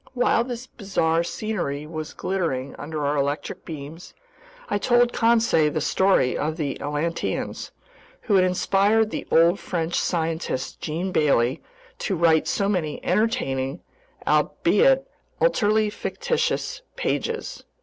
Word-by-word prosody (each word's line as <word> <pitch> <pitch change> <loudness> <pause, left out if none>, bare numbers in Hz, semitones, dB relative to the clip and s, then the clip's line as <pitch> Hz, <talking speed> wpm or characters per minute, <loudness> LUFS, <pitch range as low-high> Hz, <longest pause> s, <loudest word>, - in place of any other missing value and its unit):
While 245 -1 +2
this 245 0 -5
bizarre 185 -8 0
scenery 170 -8 -3
was 155 0 -6
glittering 160 -9 -2
under 150 0 -4
our 145 +1 +1
electric 140 +2 -2
beams, 155 +2 -9 0.5
I 205 - 0
told 240 +1 +3
Conseil 225 - +3
the 155 - -1
story 190 -5 +2
of 155 +2 -2
the 145 -5 -3
Atlanteans, 150 +3 -2 0.5
who 215 - -1
had 190 -2 +6
inspired 200 +4 +2
the - - -5
old 170 +4 +4
French 165 -1 -3
scientist 165 -6 -2
Jean 170 +4 -3
Bailly 140 -4 +2 0.4
to 195 - -1
write 160 -2 +3
so 200 - 0
many 175 -7 -1
entertaining—albeit 225 - +1 0.3
utterly 215 - +3
fictitious—pages. 480 - -2
175 Hz, 115 wpm, -24 LUFS, 155-220 Hz, 0.5 s, had